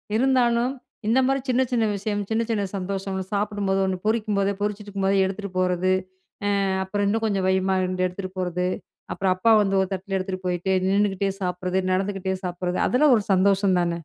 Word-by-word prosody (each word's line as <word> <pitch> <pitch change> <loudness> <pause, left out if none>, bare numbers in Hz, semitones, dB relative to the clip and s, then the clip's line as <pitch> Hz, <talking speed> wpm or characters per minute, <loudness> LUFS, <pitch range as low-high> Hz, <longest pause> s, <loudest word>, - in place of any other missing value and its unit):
இருந்தாலும், 245 0 +2 0.4
இந்த 245 +4 +4
மாரி 270 0 +1
சின்ன, 255 +1 +3
சின்ன 230 -2 +2
விஷயம், 205 +1 -2
சின்ன 225 +1 +1
சின்ன 215 -3 0
சந்தோஷம் 195 0 -3
,சாப்பிடும்போது 200 -1 0
ஒண்ணு 190 -1 -1
பொரிக்கும்போதே 210 -3 +1
பொறிச்சிட்ருக்கும்போதே 200 -2 0
எடுத்துட்டு 195 +1 -4
போறது, 185 0 +1 0.7
அ - - +1 0.2
அப்புறம் 205 +1 -1
இன்னும் 225 +2 0
கொஞ்சம் 195 -3 0
வையுமான்னு 190 0 +2
2 185 0 -1
எடுத்துட்டு 185 +1 -6
போறது. 180 0 -1 0.5
அப்புறம் 190 -1 +1
அப்பா 225 +5 +2
வந்து 195 -1 0
ஒரு 190 - 0
தட்டுல 190 +1 -3
எடுத்துட்டு 185 0 -5
போயிட்டு, 180 +1 -1 0.2
நின்னுக்கிட்டே 195 0 +1
சாப்பிடுறது, 180 0 -1
நடந்துக்கிட்டே 190 0 -1
சாப்பிடுறது 180 0 -2
அதெல்லாம் 275 +1 +4
ஒரு 215 - 0
சந்தோஷம் 195 0 +3
தான. 175 -1 +1
195 Hz, 160 wpm, -24 LUFS, 185-210 Hz, 0.7 s, இந்த